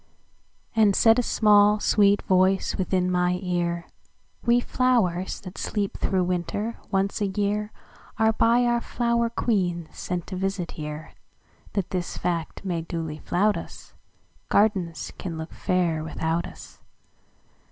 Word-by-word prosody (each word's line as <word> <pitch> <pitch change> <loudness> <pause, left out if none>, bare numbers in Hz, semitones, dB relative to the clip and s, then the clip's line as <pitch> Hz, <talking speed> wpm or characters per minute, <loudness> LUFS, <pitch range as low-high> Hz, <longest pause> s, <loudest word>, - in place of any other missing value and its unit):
And 210 -3 +4
said 225 +1 +5
a - - +4
small, 210 -2 +4
sweet 205 -1 +3
voice 190 +1 +2
within 185 -1 0
my 180 0 +1
ear:"We 175 +6 -2
flowers, 230 -9 +1
that 185 -1 -9
sleep 205 -2 -2
through 190 -2 0
winter, 180 +5 -2
once 195 +2 0
a 205 - +2
yearAre 210 +2 -2
by 235 +2 +4
our 240 0 +2
flower 235 -1 0
queen 180 -8 -1
sent 180 -2 -4
to 190 - -6
visit 190 -1 -2
here, 150 0 -7 0.6
That 195 -4 -2
this 180 -2 -3
fact 170 +1 -3
may 175 -3 -1
duly 160 -2 -5
flout 205 +7 +1
us,—Gardens 190 -7 -3
can 170 -3 -5
look 160 0 -7
fair 170 -4 0
without 160 +2 -2
us. - - -13
190 Hz, 125 wpm, -25 LUFS, 175-210 Hz, 0.6 s, said